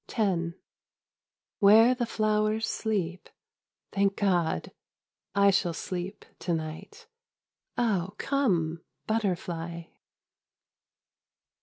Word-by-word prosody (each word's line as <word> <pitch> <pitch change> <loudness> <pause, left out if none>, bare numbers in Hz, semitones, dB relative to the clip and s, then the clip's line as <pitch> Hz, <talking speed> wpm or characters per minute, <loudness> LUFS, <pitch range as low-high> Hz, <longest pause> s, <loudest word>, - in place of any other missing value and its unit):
X 180 -7 0 1.1
Where 220 +4 +7
the 245 -2 -2
flowers 215 0 +1
sleep, 185 -5 -2 0.6
Thank 195 0 +2
God! 175 - +1 0.6
I 200 0 +6
shall 180 -3 +1
sleep, 185 +4 -5
to 175 - 0
night. 155 -1 -7 0.7
Oh, 200 -5 0
come, 175 - 0 0.2
butterfly 175 -6 -2
195 Hz, 75 wpm, -28 LUFS, 170-215 Hz, 1.1 s, Where